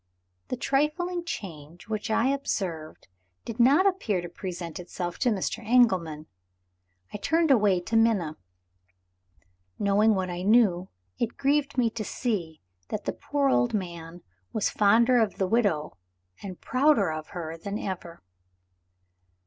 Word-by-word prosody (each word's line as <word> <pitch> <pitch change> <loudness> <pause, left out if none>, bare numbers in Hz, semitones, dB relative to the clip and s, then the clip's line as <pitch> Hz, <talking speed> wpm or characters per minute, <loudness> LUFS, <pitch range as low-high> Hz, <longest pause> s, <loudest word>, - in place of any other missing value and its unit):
The 255 - -3
trifling 340 +7 0
change 170 - -8
which 215 +1 -3
I 230 +4 +2
observed 185 - -3 0.4
did 230 - -7
not 275 +10 +5
appear 360 - +1
to 175 0 -6
present 175 -2 -6
itself 175 0 -5
to 250 - +2
Mr. 220 +2 -2
Engelman. 185 -10 +2 0.9
I - - -3
turned 320 +7 +2
away 205 -7 +4
to 225 +6 -4
Minna. 215 -9 +2 1.4
Knowing 205 +2 +3
what 185 -1 -2
I 175 0 -4
knew, 195 -3 +3 0.3
it 235 - -2
grieved 285 0 +1
me 235 -3 +2
to 220 - -4
see 185 -10 -3 0.3
that 215 - -5
the - - -1
poor 285 -1 0
old 240 -3 +2
man 170 -3 -6 0.3
was 215 - 0
fonder 235 +4 +4
of 220 -4 +1
the 190 - +1
widow, 185 - 0 0.5
and 185 -3 -8
prouder 255 - +2
of 155 0 -6
her 165 -1 -5
than 200 +5 -5
ever. 175 - -6
210 Hz, 140 wpm, -27 LUFS, 175-245 Hz, 1.4 s, not